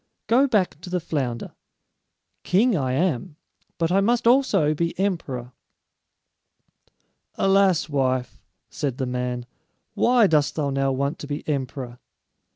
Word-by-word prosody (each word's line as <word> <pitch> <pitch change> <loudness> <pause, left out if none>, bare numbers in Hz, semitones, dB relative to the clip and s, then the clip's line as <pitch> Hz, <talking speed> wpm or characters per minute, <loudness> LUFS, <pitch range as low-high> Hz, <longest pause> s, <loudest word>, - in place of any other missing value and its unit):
Go 255 +5 +4
back 195 - 0
to 180 - -9
the 180 0 0
flounder. 130 -8 -3 0.9
King 220 +5 +3
I 130 -5 -1
am, 160 +1 -1 0.4
but 165 0 0
I 195 +2 +4
must 235 +4 +1
also 220 - +3
be 170 +2 -2
emperor." 140 -11 -2 1.8
"Alas, 195 -5 +3
wife," 130 -4 -1 0.3
said 135 -4 -3
the 130 - -1
man, 125 -1 -3 0.5
"why 245 -2 +4
dost 150 -5 +2
thou 145 -3 -1
now 135 0 0
want 140 +4 -2
to 145 - -7
be 145 0 -5
emperor?" 130 -4 -4
150 Hz, 130 wpm, -24 LUFS, 130-190 Hz, 1.8 s, Go